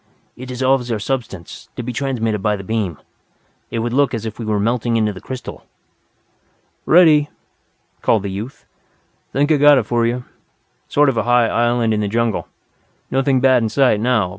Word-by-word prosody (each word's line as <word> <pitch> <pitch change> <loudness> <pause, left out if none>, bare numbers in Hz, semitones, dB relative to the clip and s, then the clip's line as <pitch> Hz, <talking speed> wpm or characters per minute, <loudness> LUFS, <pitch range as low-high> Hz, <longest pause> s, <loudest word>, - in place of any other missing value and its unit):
"It 130 - -9
dissolves 130 -1 0
our 115 - 0
substance, 105 -6 -5
to 125 - -5
be 125 +1 -5
transmitted 115 -4 -1
by 105 +1 +1
the 95 - -8
beam. 100 -6 -2 0.7
It - - -4
would 120 - -3
look 140 -1 +2
as 115 -1 -5
if 110 0 -6
we 115 - -4
were 105 -1 0
melting 115 +2 0
into 105 -2 0
the 95 - -11
crystal." 130 -1 -8 1.2
"Ready," 155 -4 +5 0.7
called 110 -4 +2
the 100 - -4
youth. 110 +7 -7 0.7
"Think 145 +3 +1
I've 150 - +3
got 145 0 +7
it 125 - +2
for 120 0 +1
you. 125 +1 -2 0.6
Sort 145 0 +3
of 125 - -2
a 110 - +1
high 120 -1 +4
island 120 -1 +1
in 105 - 0
the 105 - -1
jungle. 115 +1 -1 0.6
Nothing 135 -1 +1
bad 130 -2 +4
in 110 - 0
sight 130 -4 +2
now. 110 -5 +1
120 Hz, 185 wpm, -19 LUFS, 110-130 Hz, 1.2 s, got